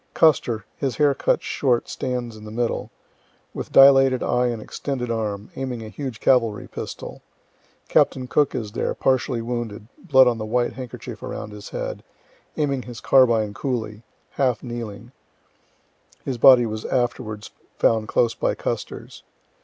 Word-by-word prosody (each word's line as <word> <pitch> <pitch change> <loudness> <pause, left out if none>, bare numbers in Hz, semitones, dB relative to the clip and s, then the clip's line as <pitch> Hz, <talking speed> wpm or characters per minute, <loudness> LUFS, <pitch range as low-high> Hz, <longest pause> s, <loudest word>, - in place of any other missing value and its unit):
Custer 120 -9 +3
(his 135 -4 -2
hair 145 -2 +4
cut - - 0
short 125 -4 0
stands 125 -3 -4
in 105 - -12
the 110 - -8
middle), 115 +2 -2 0.6
with - - -6
dilated 135 -2 +6
eye 125 0 +1
and 120 -2 -2
extended 125 +2 -4
arm, 105 -2 -3
aiming 125 -4 -4
a - - -8
huge 130 0 -6
cavalry 115 -5 +2
pistol. - - -7 0.7
Captain 130 -1 +2
Cook 145 +3 +2
is 110 -5 -4
there, - - -2
partially 130 -2 0
wounded, 115 -3 -4
blood 130 -7 +5
on 120 -2 +1
the - - -3
white 120 +2 0
handkerchief 130 -3 -8
around 105 - -6
his 105 0 -9
head, - - -5 0.5
aiming 140 -3 0
his 120 -1 -9
carbine 115 -6 +4
coolly, 110 -4 -3 0.3
half 125 -5 0
kneeling 120 -1 -7 1.1
(his 130 -3 -3
body 125 -1 +8
was 110 -1 -4
afterwards 120 -4 -2 0.3
found 110 -1 +2
close 115 -1 +2
by - - -1
Custer's.) - - -5
120 Hz, 145 wpm, -23 LUFS, 110-130 Hz, 1.1 s, body